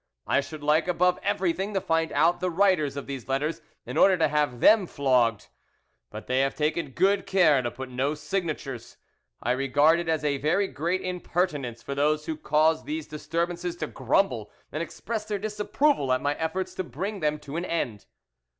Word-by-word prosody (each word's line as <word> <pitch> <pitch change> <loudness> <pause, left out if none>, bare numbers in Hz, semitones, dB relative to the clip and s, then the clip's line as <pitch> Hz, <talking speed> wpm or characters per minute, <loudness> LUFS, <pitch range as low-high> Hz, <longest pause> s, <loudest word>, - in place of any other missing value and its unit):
I 140 - +2
should 155 +1 -9
like 155 +3 +3
above 180 0 +2
everything 195 0 -1
to - - +3
find 165 -2 0
out 165 +4 +3
the 185 - 0
writers 170 -6 +2
of 140 - -5
these 135 -3 -6
letters, 150 +5 -1 0.2
in - - -5
order 190 -1 +6
to 160 -2 +2
have 145 -5 0
them 210 - +5
flogged; 125 -7 +1 0.6
but 105 +1 -8
they 130 +1 +1
have 135 0 +1
taken 155 0 -1
good 190 +9 +1
care 160 -8 +4
to 120 - -2
put 130 +2 -7
no 130 +4 -1
signatures. 150 -8 -4 0.5
I 120 - +1
regard 145 +5 +3
it 170 -1 -3
as 155 -2 0
a 140 -2 0
very 175 +8 +1
great 170 +5 -2
impertinence 170 -9 -2
for 140 - -4
those 150 +2 +1
who 160 - -3
caused 155 - +1
these 315 +1 -3
disturbances 170 +3 -3
to 160 - -3
grumble 130 - 0 0.2
and 155 - -3
express 215 +6 -4
their 210 -1 -2
disapproval 210 - 0
at 130 - +3
my 145 +2 0
efforts 180 +4 -3
to 185 - -3
bring 190 - -5
them 150 -2 0
to 150 -1 -9
an 170 +2 -2
end." 125 - -3
155 Hz, 185 wpm, -26 LUFS, 140-180 Hz, 0.6 s, order